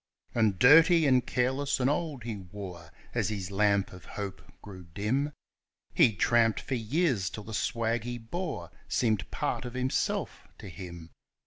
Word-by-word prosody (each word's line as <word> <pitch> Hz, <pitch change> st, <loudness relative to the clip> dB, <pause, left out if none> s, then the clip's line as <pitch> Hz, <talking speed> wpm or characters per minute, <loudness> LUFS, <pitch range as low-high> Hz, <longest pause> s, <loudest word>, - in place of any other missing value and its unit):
And 110 Hz, -5 st, +2 dB
dirty 160 Hz, -, +7 dB
and 130 Hz, -3 st, +3 dB
careless 130 Hz, +3 st, 0 dB
and 125 Hz, -, +2 dB
old 145 Hz, -3 st, -1 dB
he 115 Hz, -2 st, -4 dB
wore, 90 Hz, -3 st, -9 dB, 0.2 s
as -, -, 0 dB
his 100 Hz, -3 st, -4 dB
lamp 100 Hz, -1 st, +2 dB
of 90 Hz, -2 st, -11 dB
hope 100 Hz, -2 st, -6 dB, 0.2 s
grew 95 Hz, -3 st, -10 dB
dim; 130 Hz, +9 st, 0 dB, 0.6 s
He 110 Hz, -, +4 dB
tramped 115 Hz, +3 st, +3 dB
for -, -, -5 dB
years 120 Hz, -, +1 dB
till 105 Hz, -, -8 dB
the 110 Hz, -, -9 dB
swag 115 Hz, +1 st, 0 dB
he 120 Hz, +1 st, -4 dB
bore 160 Hz, +9 st, -5 dB, 0.2 s
seemed 110 Hz, -5 st, 0 dB
part -, -, -2 dB
of 125 Hz, -1 st, -7 dB
himself 130 Hz, +1 st, -1 dB
to 95 Hz, -, -9 dB
him. 85 Hz, -3 st, -9 dB
115 Hz, 155 wpm, -29 LUFS, 100-130 Hz, 0.6 s, dirty